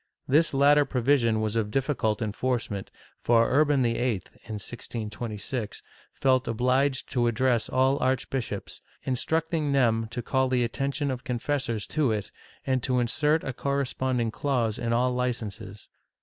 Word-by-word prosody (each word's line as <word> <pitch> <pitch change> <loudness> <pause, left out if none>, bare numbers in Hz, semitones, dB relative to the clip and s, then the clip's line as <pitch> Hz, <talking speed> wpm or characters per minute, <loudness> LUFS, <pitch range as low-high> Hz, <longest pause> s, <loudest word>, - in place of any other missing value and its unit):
This 155 +5 +4
latter 145 +2 +5
pro 135 -2 -2
vision 115 -4 +3
was 110 0 -1
of 110 -2 0
difficult 120 -4 0
enforcement, 110 -2 -2 0.3
for 115 -1 +4
Urban 145 -1 +3
YIII, 115 -4 0 0.2
in 110 - -5
1626, 110 +1 -5 0.3
felt 130 -1 +2
obliged 130 +4 +1
to 120 -3 +2
address 120 0 +1
all 130 +2 +2
archbishops, 130 -5 -2 0.2
instructing 155 +3 0
them 115 -4 +2
to 120 +1 -5
call 130 +1 +1
the 125 -1 +2
attention 140 +4 -1
of 125 -1 -5
confessors 125 -3 -2
to 150 -6 +1
it, 105 -2 -3 0.3
and 130 -1 +1
to 125 +1 0
insert 150 +6 +1
a 135 - -3
corresponding 130 -3 -1
clause 120 -5 -1
in 115 -1 -1
all 125 +2 +2
licences. 110 -5 -4
125 Hz, 140 wpm, -27 LUFS, 115-135 Hz, 0.3 s, latter